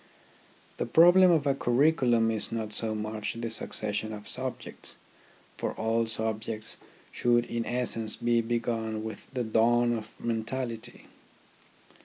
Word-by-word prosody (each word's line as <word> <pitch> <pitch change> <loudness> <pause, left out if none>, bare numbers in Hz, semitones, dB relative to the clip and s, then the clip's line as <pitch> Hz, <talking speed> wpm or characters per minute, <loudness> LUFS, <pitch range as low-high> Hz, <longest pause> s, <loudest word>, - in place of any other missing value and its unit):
The - - -2
problem 175 +3 +7
of 160 -4 +3
a 140 - +3
curriculum 120 -3 +3
is 110 -2 -3
not 110 -2 -3
so 110 0 0
much 110 0 -4
the 115 -1 -4
succession 110 -1 -2
of 105 -1 -9
subjects; - - -3 0.6
for - - -2
all 115 +1 0
subjects 110 0 -2 0.3
should 120 0 +2
in 115 -1 -3
essence 115 -3 +1
be 120 0 +1
begun 115 -1 -2
with 110 -2 -7
the 130 -2 -2
dawn 120 +2 +3
of 110 -1 -8
mentality. 115 0 -4
115 Hz, 130 wpm, -28 LUFS, 110-120 Hz, 0.6 s, problem